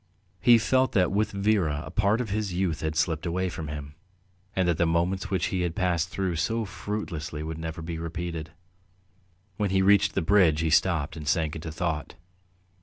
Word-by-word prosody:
He 120 Hz, +6 st, +7 dB
felt 130 Hz, +4 st, +2 dB
that 90 Hz, -6 st, +3 dB
with 105 Hz, +2 st, +1 dB
Vera 100 Hz, -7 st, +1 dB
a 70 Hz, -, -8 dB
part 105 Hz, +5 st, +2 dB
of 110 Hz, -5 st, -4 dB
his 105 Hz, -2 st, -1 dB
youth 90 Hz, -3 st, -1 dB
had 80 Hz, 0 st, -2 dB
slipped 80 Hz, +1 st, 0 dB
away 90 Hz, +2 st, -1 dB
from 80 Hz, -2 st, -6 dB
him, 75 Hz, -1 st, -6 dB, 0.6 s
and 95 Hz, -2 st, +2 dB
that 85 Hz, -2 st, +2 dB
the 85 Hz, -, +3 dB
moments 90 Hz, +4 st, 0 dB
which 95 Hz, -1 st, 0 dB
he 95 Hz, -, 0 dB
had 85 Hz, -2 st, -1 dB
passed 90 Hz, -1 st, 0 dB
through 95 Hz, -3 st, -2 dB
so 115 Hz, +6 st, 0 dB
fruitlessly 85 Hz, -7 st, -5 dB
would 80 Hz, 0 st, -5 dB
never 80 Hz, 0 st, -5 dB
be 80 Hz, 0 st, -5 dB
repeated. 85 Hz, -1 st, -4 dB, 1.1 s
When 105 Hz, -2 st, 0 dB
he 95 Hz, 0 st, +2 dB
reached 100 Hz, 0 st, +4 dB
the -, -, +1 dB
bridge 85 Hz, -4 st, +4 dB
he 80 Hz, -1 st, 0 dB
stopped 80 Hz, -3 st, +2 dB
and 75 Hz, -2 st, -7 dB
sank 80 Hz, -2 st, +1 dB
into 80 Hz, 0 st, -6 dB
thought. 80 Hz, -2 st, -3 dB
85 Hz, 190 wpm, -27 LUFS, 80-95 Hz, 1.1 s, He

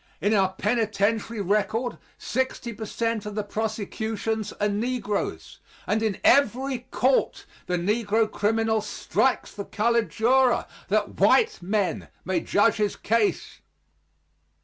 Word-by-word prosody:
In 205 Hz, +3 st, +1 dB
our 190 Hz, -3 st, +2 dB
penitentiary 215 Hz, +1 st, 0 dB
record 215 Hz, +5 st, 0 dB, 0.2 s
sixty 260 Hz, -1 st, -2 dB
per 220 Hz, 0 st, -7 dB
cent 230 Hz, -2 st, -2 dB
of 210 Hz, -, -6 dB
the 210 Hz, -, -1 dB
prosecutors 220 Hz, 0 st, -3 dB
are 205 Hz, -, 0 dB
negroes, 210 Hz, 0 st, -3 dB, 0.3 s
and 215 Hz, +1 st, 0 dB
in 215 Hz, -4 st, 0 dB
every 260 Hz, -1 st, +3 dB
court 260 Hz, +1 st, +1 dB, 0.2 s
the 180 Hz, -, 0 dB
negro 210 Hz, +4 st, +1 dB
criminal 220 Hz, +1 st, 0 dB
strikes -, -, 0 dB
the 200 Hz, -, -5 dB
colored 235 Hz, +1 st, +1 dB
juror, 250 Hz, +2 st, +3 dB, 0.2 s
that -, -, -1 dB
white 455 Hz, -, +4 dB
men 200 Hz, +1 st, -1 dB, 0.2 s
may 185 Hz, -1 st, +1 dB
judge 205 Hz, +6 st, +2 dB
his 210 Hz, -1 st, 0 dB
case. 225 Hz, -1 st, -1 dB
220 Hz, 125 wpm, -25 LUFS, 205-230 Hz, 0.3 s, white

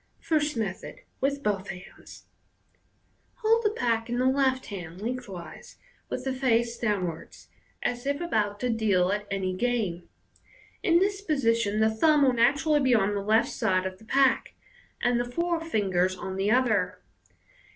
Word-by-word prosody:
First 305 Hz, -4 st, 0 dB
Method. 195 Hz, -4 st, -4 dB, 0.2 s
(With 280 Hz, +1 st, -1 dB
both 200 Hz, -3 st, -1 dB
hands).— 180 Hz, 0 st, -11 dB, 1.1 s
Hold 455 Hz, 0 st, +2 dB
the 425 Hz, -, +3 dB
pack 235 Hz, -, -1 dB
in 240 Hz, -, -1 dB
the 255 Hz, -, +1 dB
left 260 Hz, -1 st, +2 dB
hand, 180 Hz, -4 st, -8 dB
lengthways, 215 Hz, -6 st, -7 dB, 0.3 s
with -, -, -4 dB
the 265 Hz, -, -2 dB
face 235 Hz, -3 st, +1 dB
downwards, 185 Hz, -7 st, -3 dB, 0.3 s
as 245 Hz, +2 st, -2 dB
if 285 Hz, 0 st, 0 dB
about 210 Hz, -12 st, -1 dB
to 250 Hz, -1 st, 0 dB
deal 200 Hz, -5 st, +2 dB
at 205 Hz, 0 st, -2 dB
any 190 Hz, -2 st, -2 dB
game. 205 Hz, -6 st, -2 dB, 0.7 s
In 340 Hz, -1 st, +4 dB
this 395 Hz, +2 st, +1 dB
position 230 Hz, -, +1 dB
the 220 Hz, 0 st, +4 dB
thumb 295 Hz, +6 st, +4 dB
will 260 Hz, -2 st, +4 dB
naturally 285 Hz, +6 st, +3 dB
be 260 Hz, -3 st, +3 dB
on 205 Hz, -1 st, +2 dB
the 200 Hz, -, -2 dB
left 220 Hz, +3 st, +2 dB
side 190 Hz, -6 st, 0 dB
of 185 Hz, 0 st, -5 dB
the 220 Hz, -, -17 dB
pack, 270 Hz, +2 st, +2 dB, 0.5 s
and 245 Hz, 0 st, +2 dB
the 245 Hz, 0 st, -3 dB
four 340 Hz, +4 st, 0 dB
ringers 190 Hz, -, 0 dB
on 190 Hz, +1 st, -5 dB
the 195 Hz, +2 st, 0 dB
other. 220 Hz, -6 st, +2 dB
230 Hz, 160 wpm, -27 LUFS, 200-270 Hz, 1.1 s, In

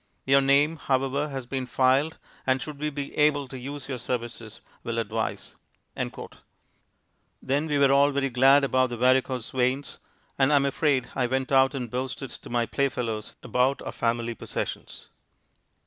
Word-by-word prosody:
Your 135 Hz, +1 st, +5 dB
name, 140 Hz, +4 st, +3 dB
however, 135 Hz, +1 st, 0 dB
has 135 Hz, -3 st, -5 dB
been 130 Hz, 0 st, -4 dB
filed 135 Hz, +5 st, +2 dB, 0.3 s
and 130 Hz, 0 st, +3 dB
should 150 Hz, +1 st, -7 dB
we 150 Hz, +1 st, -1 dB
be 140 Hz, -1 st, -6 dB
able 145 Hz, -2 st, +2 dB
to 130 Hz, -, -10 dB
use 140 Hz, +2 st, -7 dB
your 130 Hz, -3 st, -4 dB
services, 120 Hz, -2 st, -5 dB, 0.2 s
will 115 Hz, 0 st, -3 dB
advise." 110 Hz, 0 st, -3 dB, 1.9 s
Then 145 Hz, +4 st, -1 dB
we 145 Hz, -2 st, 0 dB
were 140 Hz, -1 st, +5 dB
all 140 Hz, +1 st, +5 dB
very 140 Hz, -1 st, -1 dB
glad 135 Hz, +3 st, +5 dB
about 130 Hz, -1 st, +2 dB
the 120 Hz, -, -5 dB
varicose 130 Hz, 0 st, +2 dB
veins, 130 Hz, +2 st, -1 dB, 0.4 s
and 135 Hz, +2 st, +4 dB
I -, -, +5 dB
am 140 Hz, -1 st, +3 dB
afraid 140 Hz, -2 st, +1 dB
I 125 Hz, -2 st, 0 dB
went 130 Hz, +2 st, -2 dB
out 135 Hz, 0 st, +4 dB
and 125 Hz, -3 st, -3 dB
boasted 130 Hz, +1 st, -4 dB
to -, -, -9 dB
my 120 Hz, -1 st, +1 dB
play 140 Hz, +3 st, 0 dB
fellows 115 Hz, -4 st, -4 dB
about 130 Hz, +2 st, +1 dB
our -, -, -5 dB
family 120 Hz, 0 st, -1 dB
possessions. -, -, -6 dB
135 Hz, 165 wpm, -26 LUFS, 125-140 Hz, 1.9 s, Your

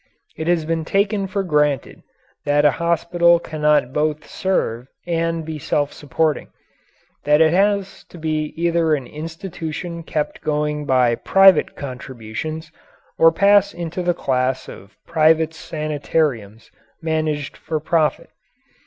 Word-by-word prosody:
It 160 Hz, -, -5 dB
has 170 Hz, -2 st, +2 dB
been 165 Hz, 0 st, -1 dB
taken 200 Hz, +3 st, 0 dB
for 195 Hz, +1 st, -2 dB
granted 150 Hz, -5 st, 0 dB, 0.4 s
that 145 Hz, 0 st, +2 dB
a 145 Hz, -, +6 dB
hospital 170 Hz, +1 st, +3 dB
cannot 150 Hz, -5 st, +1 dB
both 150 Hz, 0 st, -1 dB
serve 125 Hz, -, -1 dB, 0.2 s
and 165 Hz, -1 st, -1 dB
be 155 Hz, -1 st, -5 dB
self 145 Hz, 0 st, -1 dB
supporting 150 Hz, +1 st, -1 dB, 0.8 s
that 150 Hz, +1 st, +4 dB
it 160 Hz, 0 st, +4 dB
has 200 Hz, +1 st, +1 dB
to -, -, -14 dB
be 155 Hz, -1 st, -2 dB
either 165 Hz, -2 st, +2 dB
an 135 Hz, -3 st, -5 dB
institution 165 Hz, -, -6 dB
kept 155 Hz, -2 st, -3 dB
going 150 Hz, 0 st, -1 dB
by 125 Hz, -2 st, +3 dB
private 195 Hz, +7 st, +4 dB
contributions 130 Hz, +4 st, -6 dB, 0.5 s
or 165 Hz, 0 st, +7 dB
pass 200 Hz, +3 st, +4 dB
into 175 Hz, +1 st, -4 dB
the 175 Hz, -1 st, 0 dB
class 130 Hz, -3 st, -1 dB
of 100 Hz, +2 st, -12 dB
private 160 Hz, 0 st, +3 dB
sanitariums 150 Hz, -9 st, -3 dB, 0.3 s
managed 155 Hz, -3 st, -2 dB
for 160 Hz, -1 st, -4 dB
profit. 155 Hz, 0 st, 0 dB
155 Hz, 125 wpm, -20 LUFS, 150-170 Hz, 0.8 s, or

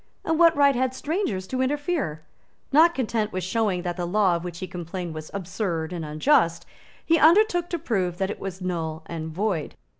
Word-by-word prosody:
And 325 Hz, 0 st, 0 dB
what 335 Hz, -1 st, +6 dB
right 280 Hz, -1 st, +5 dB
had 260 Hz, +1 st, 0 dB
strangers 285 Hz, -, -2 dB
to 255 Hz, +6 st, -2 dB
interfere? 285 Hz, -, -1 dB, 0.5 s
Not 325 Hz, +4 st, +6 dB
content 220 Hz, -4 st, -1 dB
with 185 Hz, 0 st, -3 dB
showing 190 Hz, -3 st, 0 dB
that 175 Hz, 0 st, -3 dB
the 175 Hz, -1 st, -2 dB
law 190 Hz, -1 st, +3 dB
of 170 Hz, -, -4 dB
which 175 Hz, -1 st, -6 dB
he 185 Hz, -, -4 dB
complained 175 Hz, -1 st, -6 dB
was 155 Hz, 0 st, -7 dB
absurd 180 Hz, -3 st, -3 dB
and 170 Hz, -2 st, -4 dB
unjust, 165 Hz, -, +2 dB, 0.4 s
he 330 Hz, 0 st, +3 dB
undertook 350 Hz, +2 st, +4 dB
to 345 Hz, -, -1 dB
prove 190 Hz, -, -1 dB
that 190 Hz, +1 st, -1 dB
it -, -, -7 dB
was 190 Hz, -1 st, -6 dB
null 160 Hz, -3 st, -3 dB
and 160 Hz, -1 st, -5 dB
void. 180 Hz, -1 st, -2 dB
190 Hz, 190 wpm, -25 LUFS, 170-280 Hz, 0.5 s, what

